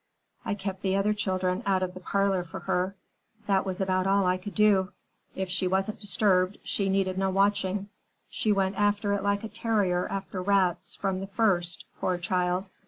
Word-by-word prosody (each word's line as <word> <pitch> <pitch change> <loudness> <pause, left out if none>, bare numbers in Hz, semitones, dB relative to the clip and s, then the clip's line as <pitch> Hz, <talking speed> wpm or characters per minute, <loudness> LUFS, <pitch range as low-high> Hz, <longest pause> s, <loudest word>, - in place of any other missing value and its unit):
I 205 - -1
kept 195 -1 -5
the 190 -1 +1
other 200 +2 +2
children 185 -2 -1
out 190 -3 +1
of 180 -1 -3
the 185 - -8
parlor 195 0 +1
for 165 - -8
her. 185 +2 -1 0.5
That 195 -1 +1
was 185 -1 -3
about 185 -1 +1
all 195 0 +3
I 180 0 +2
could 185 0 -8
do. 200 -3 +3 0.4
If 190 0 -2
she 185 +1 -1
wasn't 190 +3 0
disturbed, 195 -2 +2
she 195 -1 -1
needed 190 -1 +1
no 195 0 +1
watching. 200 0 +1 0.4
She 215 - -1
went 195 -1 +1
after 205 0 +2
it 200 - 0
like 200 +1 0
a - - -3
terrier 205 -6 0
after 195 -1 -4
rats 185 -2 +1
from 195 -2 -1
the 195 - -5
first, 190 -5 +1
poor 180 - 0
child. 180 +1 0
195 Hz, 185 wpm, -28 LUFS, 185-200 Hz, 0.5 s, all